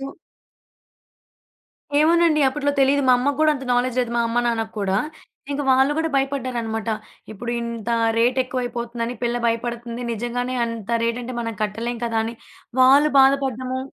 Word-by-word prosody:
So 270 - -5 1.9
ఏమోనండి. 325 0 +4
అప్పట్లో 285 +1 -1
తెలీదు. 275 +1 +3
మా - - +7
అమ్మకు 280 +3 -1
కూడా 310 0 +5
అంత 270 -2 -6
నాలెడ్జ్ 250 0 0
లేదు. 245 -2 -2
మా 235 - +2
అమ్మ, 230 +1 0
నాన్నకి 225 -2 -1
కూడా. 195 -1 0 0.6
ఇంక 285 +1 -2
వాళ్లు 265 +2 +4
కూడా 325 0 0
భయపడ్డారనమాట. 245 -5 -2 0.4
ఇప్పుడింత 235 0 -4 0.3
రేట్ 245 +3 +2
ఎక్కువైపోతుందని, 240 -1 -4
పిల్ల 240 0 0
భయపడుతుంది. 235 +1 -3
నిజంగానే 245 +3 -3
అంత 230 -2 -6
రేట్ 235 +1 -1
అంటే 250 +1 -6
మనం 230 -1 -3
కట్టలేం 230 +3 -3
కదా! 230 -1 -1
అని 230 +1 -5 0.5
వాళ్లు 280 +4 +6
బాధపడ్డము 265 -2 +1
245 Hz, 140 wpm, -22 LUFS, 230-270 Hz, 1.9 s, మా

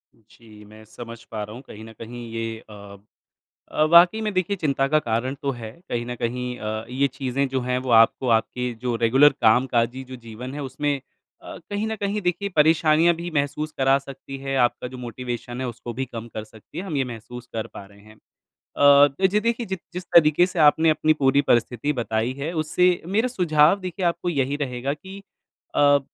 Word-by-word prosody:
जी, 110 -1 -18
मैं 110 +1 -15
समझ 115 +1 -10
पा 110 -2 -4
रहा 105 +1 -8
हूँ, 125 - -9
कहीं 110 +1 -11
न 115 - -12
कहीं 120 +1 -8
ये 115 0 -4
अ, 105 - -11 1.0
अ, 155 - +1
वाक़ई 175 +6 +7
में 215 -1 -2
देखिए 185 +2 0
चिंता 140 -6 0
का 155 +2 +3
कारण 120 +1 -2
तो 140 - 0
है। 110 -1 -7 0.2
कहीं 120 0 -2
न 125 - -4
कहीं 125 +1 -3
अ, 110 +1 -4
ये 130 +3 +1
चीज़ें 135 +1 -2
जो 130 -1 -1
हैं, 125 +1 -1
वो 130 0 -4
आपको 115 +3 +4
आपके 125 +2 -3
जो 125 -1 -1
रेगुलर 130 +6 +5
कामकाजी 120 +2 +2
जो 130 0 -9
जीवन 120 +2 -9
है, 145 - -5
उसमें 140 +2 -2 0.5
अ, - - -9
कहीं 205 +2 -2
न 220 - -2
कहीं 205 +1 -2
देखिए 180 +3 -1
परेशानियाँ 160 +2 +4
भी 170 +1 -5
महसूस 145 +2 -1
करा 135 +1 +4
सकती 135 0 -10
है। 135 0 -3
आपका 120 0 +1
जो 130 - -7
मोटिवेशन 120 0 -6
है, 130 - -2
उसको 120 0 -7
भी 135 - 0
कम 115 0 -6
कर 110 - -5
सकती 110 0 -13
है, 185 - -4
हम 160 -7 -4
ये 135 - +1
महसूस 120 +2 -9
कर 110 -1 -3
पा 100 - -8
रहे 100 0 -19
हैं। 110 +1 -17 0.4
अ, 145 0 +5
तो 145 +8 +1
जी 205 +3 +1
देखिए 235 +2 -1
जि 190 - -3 0.2
जिस 180 +1 -5
तरीके 170 0 +5
से 180 -2 -5
आपने 160 +2 +5
अपनी 155 0 +3
पूरी 140 0 +4
परिस्थिति 125 +2 +1
बताई 115 +2 -1
है, 150 +4 -3
उससे 175 +3 +1
मेरा 210 +7 +1
सुझाव 170 -5 +3
देखिए 185 0 -4
आपको 175 +1 0
यही 140 -3 0
रहेगा 130 +1 -3
कि 190 +6 -11 0.6
अ, 145 -1 +5
135 Hz, 205 wpm, -23 LUFS, 120-155 Hz, 1.0 s, वाक़ई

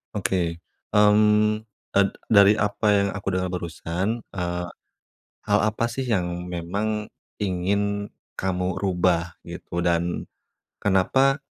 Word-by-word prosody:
Oke, 85 -4 -1 0.3
mmm, 105 +1 +5 0.3
eee, 100 0 +4 0.2
dari 100 0 +7
apa 105 +1 -1
yang 100 0 +3
aku 100 -1 -7
dengar 95 0 -1
barusan, 90 +5 -3
eee, 90 -1 -3 0.8
hal 105 0 +4
apa 110 +2 0
sih 130 +3 -3
yang 90 -6 -1
memang 105 +5 -2 0.3
ingin 100 +2 -1 0.2
kamu 90 -1 -1
rubah, 90 -3 0
gitu? 85 - -5
Dan 85 0 0 0.5
kenapa, 130 +8 +3
100 Hz, 110 wpm, -24 LUFS, 90-105 Hz, 0.8 s, dari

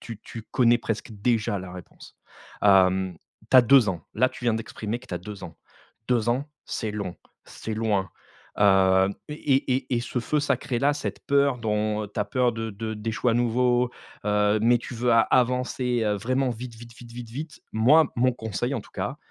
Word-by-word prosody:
tu 115 -3 -8
tu 115 - -9
connais 120 0 +3
presque 110 -1 -4
déjà 105 -1 0
la 90 -1 -8
réponse. 90 -2 -13 0.5
Hem, 95 -2 +4 0.3
tu 130 - +7
as 125 - +9
2 120 -3 +5
ans, 85 -4 -3
là 130 +4 +3
tu 120 - -11
viens 115 -2 +2
d’exprimer 110 0 -4
que 130 - -17
tu 90 - -5
as - - -3
2 100 +2 -9
ans. 80 - -10 0.5
2 120 -2 +1
ans, 130 +4 0 0.2
c’est 110 -3 -3
long, 100 -4 -5 0.3
c’est 110 - -6
loin, 105 -4 0 0.5
heu 95 -1 +5 0.2
et 135 -3 +1
et 130 -1 -3
et - - 0
ce 120 +1 -3
feu 150 +5 0
sacré 130 -3 -1
là, 145 +1 +3
cette 145 - -5
peur 140 -2 +3
dont 105 -1 -1
ta 105 0 -2
peur 125 +3 +1
de 115 0 -4
de 110 +2 -5
d’échouer 110 +3 -1
à - - 0
nouveau, 120 +1 +2 0.4
heu, 105 0 +2
mais 120 +1 +4
tu 125 - -8
veux 120 +1 +1
a 115 - +6
avancer, 125 -1 +1
heu, 105 -1 +1
vraiment 130 +5 0
vite, 120 0 -7
vite, 115 +1 -12
vite, 120 -1 -13
vite, 120 -2 -8
vite. 145 +1 -7
Moi 140 +8 +4
mon 130 +1 +3
conseil 110 -4 -3
en - - -2
tout - - -17
cas, - - -4
115 Hz, 200 wpm, -25 LUFS, 105-125 Hz, 0.5 s, as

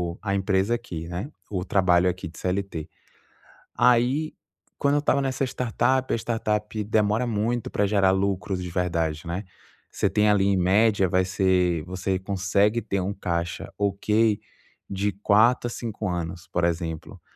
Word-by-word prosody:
o - - -22
a 100 -2 -1
empresa 95 +3 +1
aqui, 85 -9 -6
né, 90 - -5 0.2
o 95 -3 -2
trabalho 90 -2 +3
aqui 95 +1 -4
de 80 - -13
CLT. 90 -4 -3 0.9
Aí, 125 +6 +3 0.4
quando 140 0 +2
eu 145 - +3
estava 140 -1 +2
nessa 135 0 -1
startup, 130 +1 0
a - - +2
startup 110 -2 -2
demora 105 +3 +1
muito 115 +1 -1
para 105 - +1
gerar 95 -2 +3
lucros 95 -1 -1
de 90 - -5
verdade, 85 -3 -1
né? 90 +5 -4 0.4
Você - - 0
tem 105 0 +3
ali, 100 -2 +3
em 100 -1 +2
média, 100 +2 +3
vai 95 +1 +2
ser 90 -3 +1
você 95 +1 -2
consegue 100 +3 +1
ter 100 - -2
um 95 +2 -2
caixa 85 -3 -3
ok 105 +2 +1 0.5
de 100 +1 -1
4 110 +5 +3
a - - -3
5 110 -4 -4
anos, 85 -2 -4
por 85 - 0
exemplo. 80 -2 -3
100 Hz, 160 wpm, -25 LUFS, 90-110 Hz, 0.9 s, trabalho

